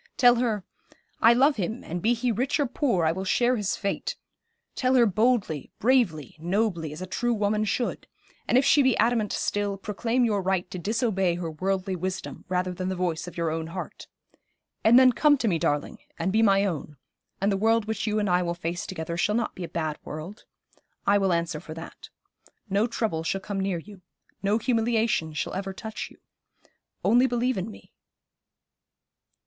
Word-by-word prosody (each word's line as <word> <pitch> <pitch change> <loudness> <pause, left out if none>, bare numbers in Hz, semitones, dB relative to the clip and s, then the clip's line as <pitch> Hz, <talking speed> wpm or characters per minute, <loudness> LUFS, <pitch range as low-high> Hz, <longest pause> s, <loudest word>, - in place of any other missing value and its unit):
Tell 245 -1 +6
her, 225 -5 0 0.6
"I 230 +1 +7
love 275 +3 +4
him, 215 +5 -3
and 175 +2 -5
be 235 +5 +3
he 240 +1 0
rich 255 +8 0
or 290 - +3
poor, 240 - 0
I 160 - +3
will 190 +3 -4
share 240 +6 +2
his 205 -4 -1
fate;" 200 -2 -3 0.6
tell 255 0 +1
her 240 -2 +6
boldly, 215 - +1
bravely, 210 - +1
nobly, 175 -2 -1
as 155 +5 -7
a - - -3
true 240 +5 -1
woman 210 0 +1
should; 240 +3 -2 0.4
and - - +4
if 270 - +4
she 285 - +5
be 260 -3 +3
adamant 225 -2 +2
still, 205 -1 -1
proclaim 230 +5 0
your 210 -3 +1
right 185 -1 0
to 185 - -5
disobey 200 -3 0
her 170 -2 -4
worldly 190 +3 -1
wisdom 185 +1 -5
rather 185 0 0
than 185 +1 -3
the 190 - -2
voice 175 -2 -2
of 175 - -9
your 165 -2 0
own 160 0 -3
heart. 180 +3 -7 0.8
And 230 +3 +7
then 260 -1 +7
come 290 +4 +4
to 240 - -1
me, 170 -5 +1
darling, 145 -1 -1 0.2
and 190 - -1
be 220 - +4
my 200 -2 +4
own, 150 -5 -4 0.4
and 200 +2 +1
the - - +2
world 225 +2 +2
which 220 0 -3
you 215 0 +1
and 210 -1 +1
I 180 -1 +3
will 170 -1 -2
face 170 0 -4
together 170 -2 -4
shall 210 +4 +1
not 235 -1 -1
be 185 - -7
a 170 - -5
bad 155 -2 -3
world. 160 +8 -8 0.6
I 200 0 +4
will 195 -1 +2
answer 170 -2 -1
for 155 - -9
that. 165 0 -10 0.6
No 205 +3 +1
trouble 220 -8 -1
shall 180 +4 -1
come 200 0 -4
near 190 -2 0
you. 195 +3 -11 0.4
No 200 +2 +2
humiliation 225 - +1
shall - - -3
ever 195 0 -4
touch 220 +3 -6
you. - - -18 0.9
Only 245 +3 +5
believe 245 +1 0
in 190 +4 -4
me.' 215 - -14
200 Hz, 195 wpm, -26 LUFS, 175-230 Hz, 0.9 s, I